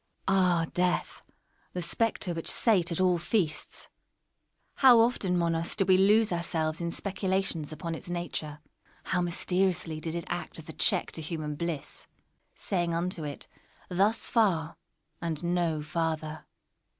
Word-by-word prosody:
Una. 195 0 +4
Ah, 175 -3 +3
Death, 180 0 0 0.5
the 180 - -3
spectre 210 0 0
which 165 -1 -2
sate 185 -7 +3
at 170 - -2
all 180 -2 +3
feasts! 170 -4 -1 0.9
How 250 -4 +8
often, 220 -6 +2
Monos, 170 -1 0
did 195 - 0
we 185 - +6
lose 210 +3 +4
ourselves 165 -2 -1
in 170 - -1
speculations 190 -4 -1
upon 165 +2 -5
its 165 - -7
nature! 160 -4 -4 0.4
How 180 - 0
mysteriously 175 -2 0
did 160 +1 -4
it 170 - -4
act 175 - -4
as 160 - -10
a 160 - -7
check - - +1
to 160 - -5
human 155 -1 -4
bliss—saying 170 +2 -4
unto 170 -1 -2
it 145 -1 -6 0.4
"thus 200 +5 +1
far, 175 -9 +2 0.5
and 165 -2 -3
no 170 -3 0
farther!" 155 0 -3
175 Hz, 140 wpm, -29 LUFS, 160-185 Hz, 0.9 s, How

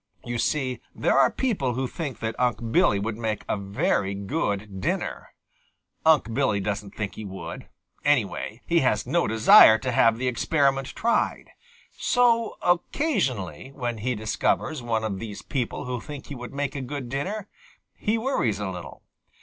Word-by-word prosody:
You 120 -1 -3
see, 130 0 -1
there - - +1
are - - +6
people 165 - -1
who 130 +1 -1
think 145 -2 -5
that 110 0 -1
Unc' 120 -2 0
Billy 105 - +4
would 110 +2 -3
make 110 -2 -2
a - - 0
very 100 0 0
good 100 - -3
dinner. - - -2 0.8
Unc' 145 -8 +4
Billy 115 -5 +1
doesn't 100 0 -4
think 105 -2 -3
he 110 - -8
would. 95 -2 -7 0.3
Anyway, 120 -4 0
he 170 0 +3
has 105 -7 +1
no 170 +7 +1
desire 110 0 +8
to 125 +3 -3
have 115 -1 +4
the 130 +2 -2
experiment 135 +1 +1
tried. 235 +1 0 0.4
So 235 -2 +2
occasionally, 135 - 0
when 120 -4 -3
he 125 +3 -1
discovers 110 +7 -1
one 115 -2 -1
of 100 -3 -2
these 105 -4 -7
people 125 -4 -3
who 125 -2 -3
think 145 +2 -8
he 140 - -7
would 120 -1 -8
make 140 0 -3
a 140 - -3
good 130 0 -5
dinner, 185 - -3 0.5
he 215 +2 0
worries 220 - 0
a 100 -2 -3
little. 90 -1 -9
120 Hz, 165 wpm, -25 LUFS, 105-145 Hz, 0.8 s, desire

